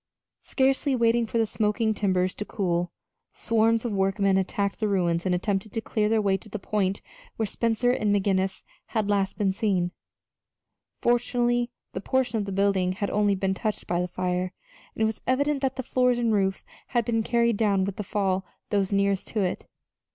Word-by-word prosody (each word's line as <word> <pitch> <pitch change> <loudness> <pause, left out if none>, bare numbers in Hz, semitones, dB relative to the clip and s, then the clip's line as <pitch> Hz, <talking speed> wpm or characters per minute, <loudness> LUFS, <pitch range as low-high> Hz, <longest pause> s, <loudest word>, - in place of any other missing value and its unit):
Scarcely 270 +1 +1
waiting 235 -1 +2
for 230 - -2
the 225 - +3
smoking 215 +1 0
timbers 185 -3 +1
to - - -5
cool, 175 -4 -1 0.4
swarms 225 +1 +2
of 235 - -1
workmen 195 0 +2
attacked 195 +1 -1
the 215 - +1
ruins 175 -3 +1
and 180 - +2
attempted 195 +2 -2
to - - -1
clear 215 -1 0
their 225 0 +3
way 195 -1 +2
to 215 +3 -14
the 215 - -4
point 200 -1 -1 0.3
where 220 - -1
Spencer 230 +3 +1
and 215 -4 +1
McGinnis 195 -1 +1 0.3
had 205 -1 +1
last 195 -1 0
been 200 -3 +1
seen. 190 -4 0 1.1
Fortunately, 240 0 +2 0.2
that - - -4
portion 245 0 0
of 205 - -2
the 200 - -5
building 190 -2 +1
had 200 +1 -3
only 205 -1 +2
been 190 0 0
touched 215 +2 -3
by 175 0 0
the 180 - -1
fire, 180 0 -2 0.4
and 220 - 0
it - - +4
was 220 0 -2
evident 280 +2 +1
that 265 -1 0
the 260 - -4
floors 250 0 +2
and 235 -2 +1
roof 195 -2 0 0.2
had 240 -2 0
been 225 -1 +1
carried 235 -1 +2
down 200 -3 +2
with 200 -1 -4
the 210 - -3
fall 195 -1 0
of 190 - -7 0.3
those 200 -2 +1
nearest 200 -1 +1
to 215 - -1
it. 180 -2 -2
205 Hz, 195 wpm, -26 LUFS, 190-230 Hz, 1.1 s, it